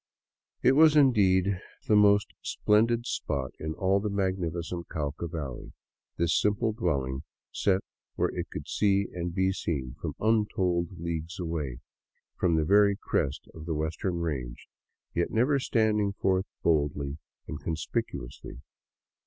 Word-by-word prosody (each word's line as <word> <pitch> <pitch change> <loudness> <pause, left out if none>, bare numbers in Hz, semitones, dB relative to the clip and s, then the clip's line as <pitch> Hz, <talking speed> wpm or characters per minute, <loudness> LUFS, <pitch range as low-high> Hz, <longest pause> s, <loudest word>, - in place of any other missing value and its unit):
It - - +6
was, 155 +2 +6
indeed, 100 -8 +4 0.3
the 105 - +4
most 105 -2 +5
splendid 115 +3 +2
spot 70 - -2
in 80 0 -4
all 95 +1 +2
the 105 +1 -2
magnificent 90 -3 -2
Cauca 75 +2 -3
valley, 75 -7 -6 0.4
this 85 0 +2
simple 105 +2 +1
dwelling 65 - -1 0.3
set 95 -1 +1 0.3
where - - +1
it - - -3
could - - -7
see 100 -1 +2
and 85 -1 -3
be 95 +2 +1
seen 70 -9 -3
from - - -4
untold 95 -5 +1
leagues 85 0 -4
away, 75 -8 -3 0.5
from 85 -3 +2
the 80 -1 +2
very 100 +3 +5
crest 70 -8 -1
of 80 0 -10
the 80 - -1
western 80 +4 -2
range, 65 -8 -4 0.5
yet 85 - 0
never 130 +5 +2
standing 105 -5 +1
forth 95 -1 +1 0.2
boldly 75 -2 +1 0.3
and - - -6
conspicuously. 80 -8 -4
90 Hz, 135 wpm, -28 LUFS, 80-105 Hz, 0.5 s, It